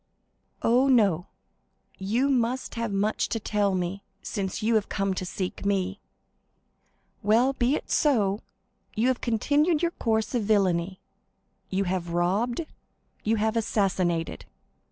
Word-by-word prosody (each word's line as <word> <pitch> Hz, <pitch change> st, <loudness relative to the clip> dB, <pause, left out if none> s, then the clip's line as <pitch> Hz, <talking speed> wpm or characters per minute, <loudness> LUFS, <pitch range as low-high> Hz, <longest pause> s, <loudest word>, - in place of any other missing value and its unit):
"Oh, 250 Hz, +4 st, +4 dB
no. 200 Hz, -10 st, +3 dB, 0.7 s
You 225 Hz, +8 st, +1 dB
must 255 Hz, -1 st, 0 dB
have 230 Hz, -2 st, -2 dB
much 200 Hz, +2 st, 0 dB
to 225 Hz, -, -1 dB
tell 205 Hz, -2 st, 0 dB
me, 185 Hz, +2 st, -2 dB, 0.2 s
since 195 Hz, -1 st, -3 dB
you 230 Hz, +2 st, +2 dB
have 215 Hz, -2 st, +1 dB
come 195 Hz, -1 st, 0 dB
to 185 Hz, -1 st, -4 dB
seek 185 Hz, 0 st, -4 dB
me." 195 Hz, -1 st, 0 dB, 1.2 s
50155m -, -, -9 dB
"Well, 240 Hz, +5 st, +4 dB
be 260 Hz, +2 st, +1 dB
it -, -, -6 dB
so. 210 Hz, -9 st, +2 dB, 0.6 s
You 230 Hz, +4 st, +2 dB
have 255 Hz, -, -1 dB
continued 295 Hz, +8 st, +2 dB
your 340 Hz, -, +2 dB
course 220 Hz, -6 st, -1 dB
of 245 Hz, -, +1 dB
villany; 190 Hz, -3 st, +1 dB, 0.7 s
you 195 Hz, +1 st, 0 dB
have 180 Hz, -2 st, -2 dB
robbed—you 220 Hz, -, -2 dB
have 220 Hz, +1 st, 0 dB
assassinated." 185 Hz, -7 st, 0 dB
210 Hz, 135 wpm, -26 LUFS, 190-240 Hz, 1.2 s, Oh